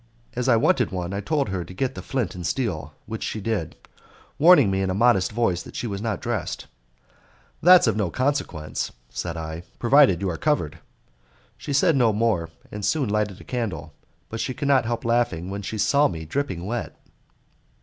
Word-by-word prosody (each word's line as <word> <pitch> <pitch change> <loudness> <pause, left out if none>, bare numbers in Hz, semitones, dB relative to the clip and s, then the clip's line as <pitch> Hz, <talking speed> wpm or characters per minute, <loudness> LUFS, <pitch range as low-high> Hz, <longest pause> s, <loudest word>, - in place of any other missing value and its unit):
As 125 +1 0
I 120 - +6
wanted 115 - +3
one, 90 0 -3
I 100 - -2
told 140 +1 0
her 95 -2 -2
to 90 - -11
get 130 +6 -1
the - - -7
flint 125 -8 -2
and 90 - -7
steel, 80 - -2
which 110 -1 -6
she 110 - -3
did, 105 -6 -2 0.6
warning 150 - +7
me 95 0 0
in 95 - 0
a 95 - -1
modest 100 -4 +3
voice 105 -6 0
that - - -12
she - - -3
was 100 -3 -4
not 110 -3 -2
dressed. - - -3 1.0
"That's 180 +1 +8
of 115 -4 +2
no 105 -4 0
consequence," 130 - -2 0.2
said 85 -1 -4
I, 80 0 -5 0.2
"provided 125 - +5
you 95 -1 -1
are 80 - -4
covered." 145 - 0 0.8
She - - -7
said 155 +4 +3
no 120 -4 +4
more, 105 -7 +1 0.2
and 105 0 -6
soon 140 0 +1
lighted 105 -2 -1
a - - -12
candle, 90 - -4 0.3
but 110 - -6
she 130 - -2
could 140 - -3
not 135 -4 +4
help 115 0 -3
laughing 115 -7 0
when 100 +1 -4
she 110 +2 -5
saw 140 +9 +4
me 80 -2 -6
dripping 95 - -3
wet. 120 +3 -4
110 Hz, 195 wpm, -24 LUFS, 90-125 Hz, 1.0 s, That's